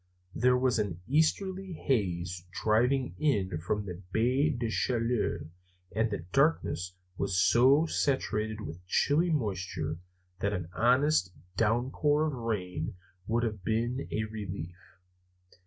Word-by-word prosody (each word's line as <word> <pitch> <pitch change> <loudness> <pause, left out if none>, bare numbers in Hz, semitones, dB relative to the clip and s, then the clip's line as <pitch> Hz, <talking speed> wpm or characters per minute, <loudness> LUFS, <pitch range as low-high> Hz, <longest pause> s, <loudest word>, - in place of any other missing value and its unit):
There 125 +1 +3
was 125 -2 +2
an 95 -5 -2
easterly 185 +6 +1
haze 90 - -1 0.2
driving 125 +5 +2
in 100 - +1
from 105 +5 -2
the 90 -1 -7
Baie 130 +7 +2
des 120 -6 -2
Chaleurs 115 0 0 0.5
and 110 +1 +2
the 100 -5 -4
darkness 135 - +1 0.2
was 95 -2 +1
so 125 - +5
saturated 110 -8 0
with 90 -3 -7
chilly 155 - +2
moisture 90 - -2 0.4
that 100 +1 0
an 90 -4 -4
honest 125 - +3 0.2
downpour 130 +8 +2
of 155 - -1
rain 95 -9 -3 0.3
would 115 +2 +1
have 105 -5 -3
been 120 +5 -1
a 110 - 0
relief. 100 -5 -6
110 Hz, 125 wpm, -30 LUFS, 95-130 Hz, 0.5 s, so